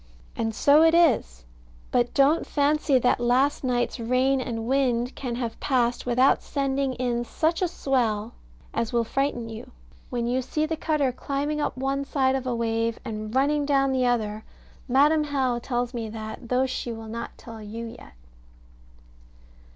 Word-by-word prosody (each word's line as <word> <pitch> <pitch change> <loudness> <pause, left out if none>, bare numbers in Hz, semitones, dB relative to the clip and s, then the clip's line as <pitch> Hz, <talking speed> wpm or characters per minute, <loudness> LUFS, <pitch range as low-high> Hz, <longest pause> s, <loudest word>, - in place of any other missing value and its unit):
And 225 -1 -2
so 290 +5 +5
it 325 0 +5
is: 230 - +2 0.5
but 245 -1 +2
don't 280 +4 +3
fancy 290 -1 +2
that 250 0 +2
last 250 +5 +2
night's 245 -1 0
rain 255 +3 +2
and 225 -3 -4
wind 250 -1 +1
can 245 -3 -4
have 235 -2 -4
passed 245 -3 0
without 250 +3 +4
sending 275 -1 -1
in 240 -1 -1
such 320 +8 -1
a 365 - +3
swell 235 -9 -1 0.4
as 230 - -1
will 235 -1 +2
frighten 245 -1 -1
you, 225 +3 -8 0.4
when 240 -2 -2
you 250 +2 0
see 305 +4 -1
the 320 +1 -2
cutter 305 -4 0
climbing 285 +4 -2
up - - -2
one 270 +1 -1
side 265 -2 +1
of 265 -1 -2
a 245 - 0
wave, 230 0 -1
and 215 +1 -5
running 290 +2 +2
down 275 -1 +2
the 255 -1 +1
other; 220 -3 -1 0.4
Madam 295 +4 +4
How 265 -4 0
tells 245 0 -2
me 230 -2 -4
that, 220 +2 -7
though 255 +1 +2
she 250 -2 -4
will 225 -1 -7
not 230 +1 -6
tell 225 -2 -10
you 220 +2 -6
yet. 230 - -11
250 Hz, 165 wpm, -25 LUFS, 235-275 Hz, 0.5 s, so